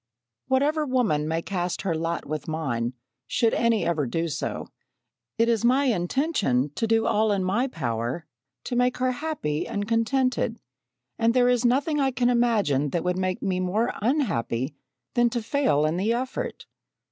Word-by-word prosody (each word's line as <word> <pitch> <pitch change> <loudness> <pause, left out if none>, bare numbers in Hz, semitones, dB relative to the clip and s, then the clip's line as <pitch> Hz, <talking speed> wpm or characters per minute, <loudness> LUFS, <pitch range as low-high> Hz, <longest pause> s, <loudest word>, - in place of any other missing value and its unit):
"Whatever 285 +4 +2
woman 240 - +1
may 165 +1 -1
cast 180 -2 -2
her 190 -4 0
lot 165 +1 -2
with 155 0 -4
mine, 130 -7 -2 0.3
should 230 -1 +2
any 230 -2 +2
ever 155 -5 0
do 165 +6 -1
so, - - -3 0.7
it 230 0 +3
is 230 -1 +1
my 255 +4 +4
intention 180 - +1
to 225 - -1
do 225 0 +2
all 215 +1 +2
in 195 -2 +1
my 210 +8 +1
power 120 - -3 0.4
to 245 - -3
make 250 +1 +2
her 255 0 +1
happy 250 - -3
and 205 0 -3
contented; 235 0 +1 0.6
and 230 +1 +3
there 250 -1 +5
is 245 -1 +2
nothing 280 +5 +2
I 270 -1 +3
can 250 -1 +1
imagine 210 - +2
that 170 +3 -1
would 180 0 0
make 185 -1 -1
me 185 -2 0
more 205 +6 0
unhappy 160 - 0 0.4
than 240 0 +3
to 235 -1 -3
fail 250 - +2
in 155 +3 0
the 210 +5 +1
effort. 260 - -4
220 Hz, 170 wpm, -25 LUFS, 165-250 Hz, 0.7 s, there